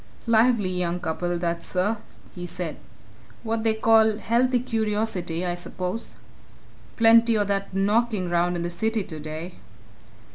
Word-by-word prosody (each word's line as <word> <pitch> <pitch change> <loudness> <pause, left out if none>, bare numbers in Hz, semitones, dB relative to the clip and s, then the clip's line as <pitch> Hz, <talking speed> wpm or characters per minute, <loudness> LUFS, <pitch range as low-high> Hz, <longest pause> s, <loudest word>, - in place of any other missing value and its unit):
"Lively 230 -4 +3
young 180 -1 -1
couple, 175 +1 -2
that, 170 -1 -2
sir!" 195 +5 0 0.4
he 175 -1 -6
said. 175 -2 -5 0.7
"What 225 -1 -1
they 220 -1 +2
call 220 -1 +4
healthy 245 +3 +2
curiosity, 210 -7 -2
I 175 - -1
suppose? 180 +4 -5 0.8
Plenty 230 0 +6
o' 205 - +2
that 200 0 -2
knocking 200 -1 +1
around 175 +1 +2
in 170 - -2
the 175 - -3
city 220 +4 -1
today." 155 +2 -7
195 Hz, 135 wpm, -25 LUFS, 175-225 Hz, 0.8 s, Plenty